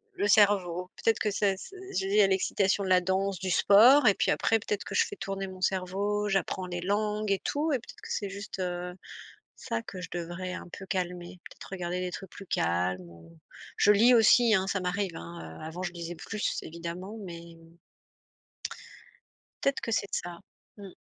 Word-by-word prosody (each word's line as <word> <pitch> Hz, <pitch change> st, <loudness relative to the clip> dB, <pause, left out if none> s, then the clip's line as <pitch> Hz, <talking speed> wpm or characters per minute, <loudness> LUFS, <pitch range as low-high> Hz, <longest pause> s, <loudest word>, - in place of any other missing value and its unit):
le 205 Hz, -, 0 dB
cerveau. 195 Hz, -4 st, +3 dB
Peut-être 225 Hz, -, +1 dB
que 210 Hz, -, +1 dB
c'est 200 Hz, 0 st, +2 dB
s 190 Hz, -, -10 dB, 0.2 s
s -, -, 0 dB
je -, -, -3 dB
lie 205 Hz, +2 st, +4 dB
à 200 Hz, -, +6 dB
l'excitation 195 Hz, +1 st, +1 dB
de 190 Hz, -, -3 dB
la 185 Hz, 0 st, +5 dB
danse, 190 Hz, +1 st, 0 dB
du 185 Hz, -1 st, -2 dB
sport 240 Hz, +9 st, +7 dB
et 205 Hz, -, +7 dB
puis -, -, +1 dB
après 225 Hz, -, +2 dB
peut-être 210 Hz, -1 st, -3 dB
que -, -, -5 dB
je -, -, +4 dB
fais 410 Hz, -, -7 dB
tourner 195 Hz, -1 st, -4 dB
mon 185 Hz, -1 st, -10 dB
cerveau, 195 Hz, +3 st, 0 dB
j'apprends 195 Hz, -1 st, -1 dB
les 175 Hz, -1 st, -4 dB
langues 210 Hz, +2 st, 0 dB
et 195 Hz, -, +2 dB
tout 305 Hz, +2 st, 0 dB
et -, -, +3 dB
peut-être 240 Hz, -, -14 dB
que -, -, -10 dB
c'est 200 Hz, -, -2 dB
juste, 200 Hz, 0 st, -7 dB
heu, 180 Hz, -1 st, -3 dB, 0.6 s
ça, 230 Hz, -2 st, -3 dB
que 190 Hz, -4 st, -8 dB
je 180 Hz, -, -6 dB
devrais 175 Hz, +1 st, -4 dB
un -, -, -7 dB
peu 195 Hz, -, -9 dB
calmer, 180 Hz, -1 st, -3 dB
peut-être -, -, -12 dB
regarder 180 Hz, -1 st, -3 dB
des 180 Hz, 0 st, -2 dB
trucs 190 Hz, 0 st, -7 dB
plus 200 Hz, -, -11 dB
calmes, 90 Hz, -, 0 dB
ou 85 Hz, -1 st, -16 dB, 0.4 s
je 205 Hz, -, +6 dB
lis 230 Hz, +5 st, +6 dB
aussi, 230 Hz, 0 st, +6 dB
hein, 190 Hz, -1 st, +2 dB
ça 195 Hz, -, 0 dB
m'arrive, 180 Hz, 0 st, -2 dB
hein, 85 Hz, -1 st, -9 dB
heu, -, -, -7 dB
avant 165 Hz, +3 st, -6 dB
je 180 Hz, -1 st, -3 dB
lisais, 170 Hz, 0 st, -6 dB
plus 210 Hz, +5 st, -3 dB
évidemment, 170 Hz, +5 st, -7 dB
mais 170 Hz, -2 st, -9 dB, 2.1 s
peut-être 275 Hz, 0 st, +1 dB
que 230 Hz, -, -3 dB
c'est 200 Hz, -, +1 dB
de -, -, -6 dB
ça, 175 Hz, -1 st, -4 dB, 0.4 s
mmh 200 Hz, -1 st, -9 dB
190 Hz, 205 wpm, -29 LUFS, 175-205 Hz, 2.1 s, sport